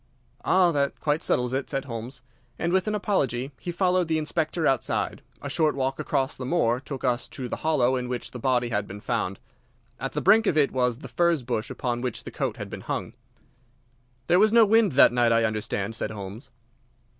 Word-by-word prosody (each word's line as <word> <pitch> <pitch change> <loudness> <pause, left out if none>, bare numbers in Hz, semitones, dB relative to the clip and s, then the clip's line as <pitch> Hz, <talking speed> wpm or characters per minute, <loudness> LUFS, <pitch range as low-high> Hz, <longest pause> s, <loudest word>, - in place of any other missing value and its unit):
"Ah, 180 -2 +4
that 140 -2 -1
quite 150 +1 0
settles 125 0 +1
it," 135 +1 -2
said 135 -1 -2
Holmes. 120 +1 -7 0.3
And 170 +1 -1
with 190 +2 +2
an 215 - 0
apology 135 - -1
he 175 - -4
followed 180 0 +1
the 160 -1 +1
Inspector 155 +1 -1
outside. 135 -5 0 0.2
A - - -3
short 155 -3 +1
walk 135 0 -1
across 135 +1 -1
the 130 - -7
moor 125 -5 +1
took 135 -1 -7
us 125 -1 0
to 130 -2 -6
the - - -4
hollow 135 -5 +2
in 125 -1 -3
which 125 -1 -4
the 125 - -7
body 125 -1 +1
had 105 -3 -1
been 100 +2 -8
found. - - -2 0.6
At - - -4
the - - -1
brink 215 +3 +5
of 155 - +2
it 145 -2 +3
was 125 -2 +1
the 145 - -9
furze 170 -5 +1
bush 115 -3 -2
upon 120 -1 -3
which 125 -3 -3
the - - -8
coat - - -3
had - - -6
been - - -6
hung. - - -4 1.1
"There 175 - +4
was 215 +1 +5
no 230 -1 +7
wind 215 -4 +4
that 130 - +6
night, 120 -1 +3
I 115 0 +3
understand," 110 -1 -2
said - - -2
Holmes. 105 +3 -8
135 Hz, 210 wpm, -26 LUFS, 120-165 Hz, 1.1 s, no